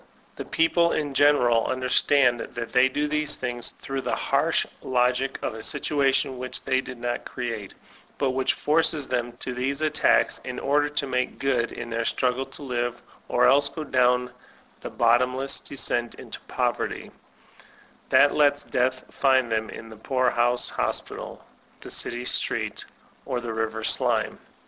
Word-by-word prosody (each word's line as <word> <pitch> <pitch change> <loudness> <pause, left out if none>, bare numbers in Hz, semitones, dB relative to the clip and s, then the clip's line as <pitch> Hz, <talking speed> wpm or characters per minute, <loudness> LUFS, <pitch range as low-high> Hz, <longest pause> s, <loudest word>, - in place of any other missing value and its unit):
The - - -6
people 170 +1 +2
in 145 -2 -2
general 125 -5 +4
understand 130 0 +2
that 115 0 -6
they 125 +1 +4
do 145 +3 -1
these 150 0 -1
things, 120 -2 -2
through 135 0 -4
the - - -1
harsh - - +1 0.2
logic 130 +1 +1
of - - -2
a 110 - -8
situation 135 -1 0
which 130 0 -3
they 130 0 +1
did 130 -1 -9
not 120 0 -3
create, 115 -5 -5 0.4
but 135 -2 +1
which 130 0 0
forces 155 -1 +2
them 120 -1 -2
to 125 +1 -6
these 135 +3 -2
attacks 155 -1 +2
in - - -7
order 145 +1 +2
to 145 -1 -1
make 130 -1 -2
good 130 -4 0
in 120 -1 -7
their 115 0 -1
struggle 130 +2 0
to - - -9
live, 120 -2 -2 0.3
or - - +3
else 140 +2 +4
go 155 +1 -6
down 125 -2 +2 0.5
the - - -7
bottomless 125 +3 +1
descent 120 -3 -2
into - - -9
poverty, - - -2 1.0
that 145 - +5
lets 145 -1 +3
Death 130 +1 0
find 130 -3 +2
them 110 0 -1
in 115 - -9
the 110 - -11
poorhouse 120 0 +1
hospital, - - -3 0.4
the - - -9
city 120 0 -2
street, - - -1 0.4
or 130 -3 -1
the 120 -2 -5
river 110 0 -2
sltme. - - +1
130 Hz, 155 wpm, -25 LUFS, 120-140 Hz, 1.0 s, that